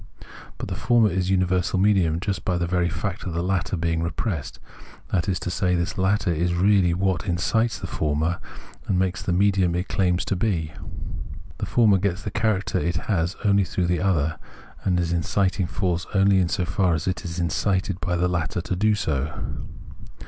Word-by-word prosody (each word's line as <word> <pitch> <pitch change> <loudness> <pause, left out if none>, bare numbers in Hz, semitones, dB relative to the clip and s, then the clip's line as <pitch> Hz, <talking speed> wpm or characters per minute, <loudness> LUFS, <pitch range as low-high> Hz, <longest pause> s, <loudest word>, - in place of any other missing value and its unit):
But - - -5
the 95 - -3
former 110 +2 +3
is 90 0 -1
uni 95 -1 +3
versal 90 0 0
medium 95 -5 +3
just 95 +2 -3
by 90 - 0
the 85 - 0
very 90 0 +1
fact 100 +3 -4
of 90 - -4
the 85 +1 -1
latter 95 0 0
being 80 0 0
repressed: 85 - -3 0.5
that 90 -1 +1
is 90 - 0
to 90 - -3
say, 90 +1 +1
this 85 +1 -1
latter 95 -1 +1
is 85 +2 0
really 95 -1 +4
what 95 0 0
in 85 -2 0
cites 110 +6 +1
the - - -6
former, 80 +3 -1 0.5
and 95 - +1
makes 95 0 0
it - - -10
the 90 - +2
medium 95 -2 +3
it 90 +2 -1
claims 90 -2 +1
to - - 0
be. 90 -6 -1 0.9
The - - -2
former 105 -5 +4
gets 95 0 -1
the 105 - -4
character 105 -2 0
it 85 +3 -1
has 90 -1 -1
only 100 -1 +4
through 90 -1 -1
the 90 0 0
other, 80 -5 +1 0.4
and 90 -2 +2
is 85 -1 0
an 85 - +2
inciting 95 +2 0
force 90 0 -1
only 95 -2 +4
so 90 +1 -1
far 90 0 +1
as 80 +2 -4
it 95 - -1
is 85 -1 -5
incited 95 +2 0
by 90 0 0
the 90 +1 +2
latter 85 -2 -1
to 90 +2 -3
be 105 +3 +3
so. 75 -6 -1
90 Hz, 200 wpm, -24 LUFS, 85-95 Hz, 0.9 s, really